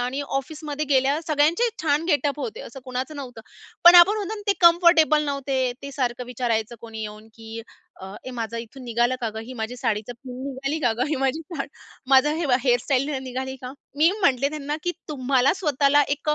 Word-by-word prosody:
आणि 255 +3 -2 0.2
ऑफिसमध्ये 300 +1 -5
गेल्यावर 275 +2 +2
सगळ्यांचे 315 +9 +2
छान 300 0 +1
गेटअप 290 -2 +1
होते, 450 +6 -5
असं 270 - -10
कुणाचं 255 +4 -4
नव्हतं. 250 -5 -8 0.4
पण 345 - +10
आपण 355 +4 +8
म्हणतो 425 0 -3
ना, 420 - -8
ते - - +6
कम्फर्टेबल 335 -3 +5
नव्हते, 270 -3 -1
ते 280 - -6
सारखं 250 -2 -2
विचारायचं 235 -2 -2
कोणी 225 -1 -8
येऊन 215 +1 -8
की 225 0 -8 0.4
अ, 190 - -8 0.2
"ए - - -4
माझं 230 0 -4
इथून 230 +3 -9
निघालं 240 +2 +1
का 230 - -1
गं? 220 - -5
ही 250 - -9
माझी 220 +3 -4
साडीची 225 -2 -2
पिन 250 +1 -10
निघाली 275 +3 -3
का 245 -5 +2
गं? 250 +4 0
ही 300 - -1
माझी 270 +3 0
साडी, 300 -3 -6 0.4
माझं 275 +3 +5
हे, 330 -1 -1 0.2
हेअर 245 -2 +4
स्टाईल 275 0 0
निघाली 260 +1 -5
का?" 250 0 -6 0.3
मी 320 +3 +5
म्हटले 275 -5 +3
त्यांना 295 -1 -4
की 350 - 0 0.2
तुम्हाला 265 -2 +2
स्वतःला 290 -3 +3
एक 295 +1 -10
अ, 300 - +3
270 Hz, 200 wpm, -24 LUFS, 245-300 Hz, 0.4 s, पण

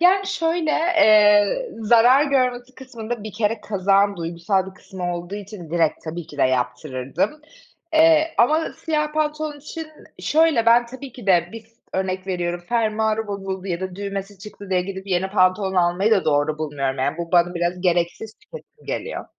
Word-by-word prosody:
Yani 385 +3 +4
şöyle, 330 -4 0
eee, 215 - +4
zarar 240 +6 +5
görmesi 255 -2 0
kısmında 235 -4 -7
bir 215 - -7
kere 215 0 -1
kazağın 200 0 +1
duygusal 170 +3 -1
bir - - -19
kısmı 180 -3 -5
olduğu 175 +3 -6
için, 200 -5 -9
direkt, 165 -2 0
tabii 165 +1 -6
ki 145 - -13
de - - +2
yaptırırdım. 130 - -1 0.5
Eee, 320 0 +4
ama 310 +7 +2
siyah 300 -1 -2
pantolon 305 -1 -2
için 320 +2 -8 0.3
şöyle, 310 -7 +2
ben 235 +1 +5
tabii 260 +1 -10
ki 240 -5 -12
de 175 -3 +3
bir 225 -1 -9 0.3
örnek 190 0 -2
veriyorum. 175 -2 -2
Fermuarı 220 -1 0
bozuldu 195 -1 -5
ya 175 -1 -3
da 185 -1 -5
düğmesi 200 0 -5
çıktı 200 0 -11
diye 180 -1 +2
gidip 190 +1 -7
yeni 190 0 -1
pantolon 190 0 +2
almayı 180 +4 +2
da 205 -3 +3
doğru 150 0 +1
bulmuyorum. 140 -3 -3
Yani 140 +5 -1
bu 170 +1 -5
bana 175 0 +3
biraz 175 +1 -2
gereksiz 175 +4 -1
tüketim 485 -1 -14
geliyor. 480 - -4
200 Hz, 165 wpm, -22 LUFS, 175-250 Hz, 0.5 s, zarar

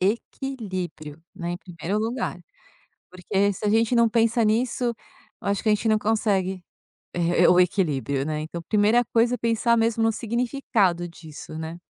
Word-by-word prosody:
equilíbrio, 185 - -3
né, 175 -2 -4
em 175 - -3
primeiro 180 +2 -4
lugar, 230 -3 -2 0.7
porque 195 +2 0
se 195 - -8
a - - +2
gente 225 +3 +2
não 235 -1 +5
pensa 230 +1 +2
nisso, 240 +3 +1 0.5
eu - - -4
acho 200 -1 0
que - - 0
a 215 - +5
gente 210 +2 -3
não 215 -1 +4
consegue, 195 -4 0 0.5
e - - -2 0.3
eh, - - +7
o 180 - +5
equilíbrio, 150 -7 +1
né, 155 0 -2
então 165 +2 -6
primeira 215 +3 +4
coisa 235 +1 +3
é - - 0
pensar 230 0 +2
mesmo 225 0 +1
no 225 - +3
significado 225 -6 0
disso, 155 -2 -10
né. 160 +2 -6
205 Hz, 170 wpm, -24 LUFS, 175-230 Hz, 0.7 s, eh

